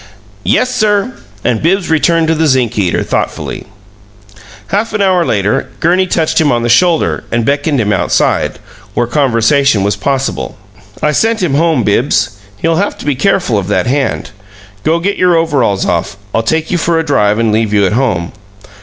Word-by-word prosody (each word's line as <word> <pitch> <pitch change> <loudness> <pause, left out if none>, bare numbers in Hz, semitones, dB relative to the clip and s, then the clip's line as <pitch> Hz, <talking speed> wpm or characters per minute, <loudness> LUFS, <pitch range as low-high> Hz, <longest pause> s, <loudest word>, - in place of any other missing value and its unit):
"Yes, 255 0 +1
sir." 215 +1 +1 0.3
And 120 -3 0
Bibbs 180 +2 0
returned 165 +1 +2
to - - +3
the 160 0 +1
zinc 125 -4 +1
eater 90 -4 0
thoughtfully. - - -3 1.0
Half 210 +3 -1
an 210 - 0
hour 185 -2 +3
later, 105 -7 0
Gurney 180 +3 +2
touched 160 -2 +1
him 150 - +2
on 120 -1 0
the 120 - -1
shoulder 170 +6 +2
and 120 -1 0
beckoned 145 +1 0
him 105 -2 +1
outside, 95 - 0 0.4
where 120 - +1
conversation 125 -2 +2
was 100 +1 0
possible. 135 -1 -2 0.5
"I 150 - +3
sent 225 +5 +1
him 160 -6 0
home, 155 -3 +2
Bibbs. 105 +6 +1 0.3
He'll 165 +8 0
have 200 +3 -1
to - - -10
be 145 - +1
careful 135 - +1
of 95 - -5
that 105 - 0
hand. 135 -2 -1 0.5
Go 160 +9 +1
get 195 +4 -2
your 180 -1 +3
overalls 135 -12 +1
off. 90 +3 -2 0.2
I'll 115 - +2
take 160 +8 -1
you 175 - +1
for 165 0 +1
a 165 - +1
drive 105 -8 +2
and 115 -1 +1
leave 110 -1 0
you 100 -1 +3
at 95 - 0
home." 110 -9 0
145 Hz, 180 wpm, -13 LUFS, 115-170 Hz, 1.0 s, to